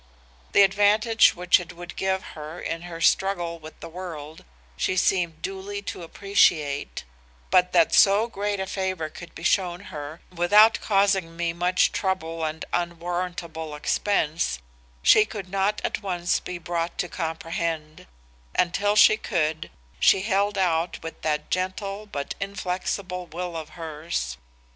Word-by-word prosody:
The 200 - +7
advantage 205 +3 +4
which 180 0 +4
it 180 - -8
would 175 0 -9
give 190 0 -1
her 155 +3 -8
in 165 - -4
her 165 -1 -7
struggle 175 -3 +1
with 155 0 -12
the - - -7
world 160 -3 -8 0.3
she 185 - -1
seemed 170 -3 +1
duly 195 +1 -5
to 200 - -6
appreciate, 155 - +1 0.5
but 180 0 +4
that 170 -2 +4
so 200 +3 +6
great 205 -3 -3
a 190 - -1
favor 185 -4 -2
could 170 +2 -11
be 165 - -9
shown 180 0 +1
her 150 +2 -7
without 205 +6 +5
causing 195 -5 +1
me 170 -1 -1
much 180 +2 +2
trouble 165 -4 -2
and 155 0 -3
an 175 0 0
unwarrantable 170 -2 -4
expense, 160 - 0 0.5
she 215 - +7
could 205 -4 -7
not 195 +2 0
at - - -2
once 180 -3 0
be 180 - -6
brought 170 0 -3
to 180 - -1
comprehend, 165 - -4 0.5
and 175 -1 +2
till 205 +2 +1
she 215 0 +7
could, 160 -8 -1 0.3
she 190 - +5
held 200 0 +1
out 170 -2 +1
with 165 - -8
that 150 -1 -2
gentle 195 +3 -2
but 140 -8 -4
inflexible 185 -1 -3
will 175 +1 -5
of 160 -2 -6
hers. 155 - -4
175 Hz, 150 wpm, -25 LUFS, 165-195 Hz, 0.5 s, The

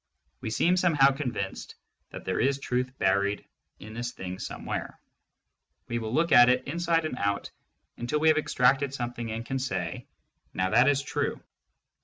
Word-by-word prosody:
We - - -4
seem 175 +11 +2
somehow 150 -7 +5
convinced 125 -9 -4 0.3
that - - -9
there - - -1
is 140 0 +2
truth 125 -2 -1
buried 100 +2 +1 0.3
in 110 +1 -10
this 120 +1 -4
thing 90 0 -6
somewhere. - - -5 0.9
We 120 - -2
will 110 -1 -4
look 165 +5 +1
at 120 0 +8
it 125 0 +2
inside 165 +2 0
and 155 - -3
out 100 0 -1 0.5
until 120 +6 -1
we 160 +1 +4
have 155 - +4
ex - - -5
tracted 135 +2 +3
something 120 -2 -4
and 115 +1 -4
can 135 +2 -2
say, 90 -10 -3 0.5
now 95 0 0
that 125 +4 +5
is 140 -1 +1
true. - - -2
125 Hz, 170 wpm, -28 LUFS, 110-140 Hz, 0.9 s, at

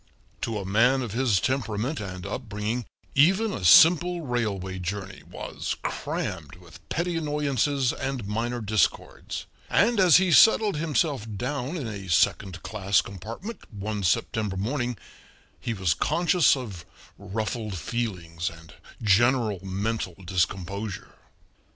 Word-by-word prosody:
To 115 -2 -2
a 100 - -4
man 120 +7 +3
of 115 - -5
his 115 -4 +2
temperament 125 - -1
and 95 -3 -6
upbringing 110 0 -3 0.3
even 190 +9 +4
a - - -5
simple 170 - +6
railway 105 - -2
journey 95 +1 -5
was - - -5
crammed - - -4
with - - -16
petty 170 +1 -1
annoyances 145 -4 0
and 130 -4 -4
minor 120 +3 -2
discords, 110 -3 -1 0.2
and 230 +1 +3
as 180 -5 +7
he 185 -1 +2
settled 215 +2 +6
himself 150 -6 0
down 135 - -3
in 145 - -4
a 100 -3 -7
second 90 +2 +1
class 100 -2 +1
compartment 115 - -8
one 105 0 -4
September 100 +1 0
morning 120 +3 -2 0.6
he 115 - -3
was 95 -5 +1
conscious 170 - +3
of 100 -10 -7 0.4
ruffled 105 +1 -3
feelings 85 -4 -3
and 80 -1 -14 0.3
general 110 0 +3
mental 95 0 -2
discomposure. 95 +2 -2
110 Hz, 125 wpm, -26 LUFS, 95-135 Hz, 0.6 s, as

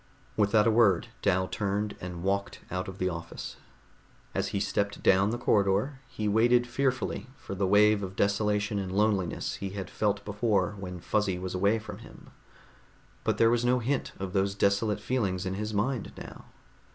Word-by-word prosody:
Without 105 0 +3
a 115 - +4
word 110 -6 +4
Dal 95 +1 +2
turned 105 +1 -2
and 90 -1 -6
walked 100 +1 -1
out 90 0 -2
of 95 -1 -7
the 95 - 0
office. 85 -2 -6 0.8
As - - 0
he 100 - -2
stepped 100 0 -1
down 95 +2 +5
the 120 - -1
corridor, 105 +4 +1
he 110 -5 -3
waited 120 +3 +4
fearfully 130 0 -1
for 115 - -7
the 95 0 0
wave 105 +1 +5
of 95 -1 -5
desolation 105 +1 +1
and 95 -2 -4
loneliness 100 -3 0
he 100 - -4
had 95 -2 -5
felt 105 -1 0
before 105 -2 +1
when 90 -2 -6
Fuzzy 100 +1 0
was 90 0 -5
away 100 +4 +2
from 110 - -8
him. - - -14 0.9
But - - 0
there 115 0 +5
was 120 0 +2
no 125 +1 +3
hint 125 +3 -1
of 95 -1 -4
those 100 0 +1
desolate 100 +2 +1
feelings 100 -7 -1
in 95 - -2
his 105 +2 -3
mind 110 +3 -1
now. - - -10
100 Hz, 175 wpm, -29 LUFS, 95-110 Hz, 0.9 s, down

